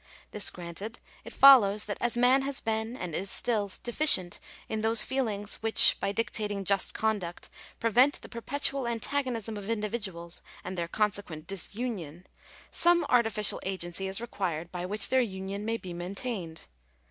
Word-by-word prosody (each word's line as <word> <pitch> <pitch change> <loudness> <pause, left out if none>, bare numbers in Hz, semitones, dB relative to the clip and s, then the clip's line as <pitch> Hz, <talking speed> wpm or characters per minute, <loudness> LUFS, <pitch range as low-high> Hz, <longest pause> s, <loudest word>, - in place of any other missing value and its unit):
This 210 -1 +3
granted, 180 +6 -8 0.3
it - - -10
follows 215 -7 +6
that 205 - -5
as 240 0 0
man 250 +2 +4
has 275 0 -3
been, 220 +2 -3
and 180 -7 -6
is 190 +5 -3
still, 210 -2 0
deficient 240 - +3 0.3
ill 220 - -3
those 225 +1 +4
feelings 215 -6 -2
which, 225 0 +6
by 200 - -1
dictating 205 -2 -1
just 195 0 +1
conduct, 205 -6 -3 0.3
prevent 245 +5 +3
the - - -9
perpetual 275 +2 -1
antagonism 235 -2 -2
of 205 +1 -8
individuals 210 -6 -4 0.2
and 185 - -6
their 170 -2 -3
consequent 200 -6 -2
dis 195 +2 -2
union, 185 - -5 0.5
some 345 0 +3
artificial 225 -4 +3
agency 190 0 -3
is 190 +2 0
required 180 -8 -4
by 180 0 -5
which 210 +2 +2
their 260 0 +3
union 195 -2 -5
may 225 +1 -1
be 185 -5 -9
maintained. 180 -1 -6
210 Hz, 155 wpm, -28 LUFS, 190-235 Hz, 0.5 s, follows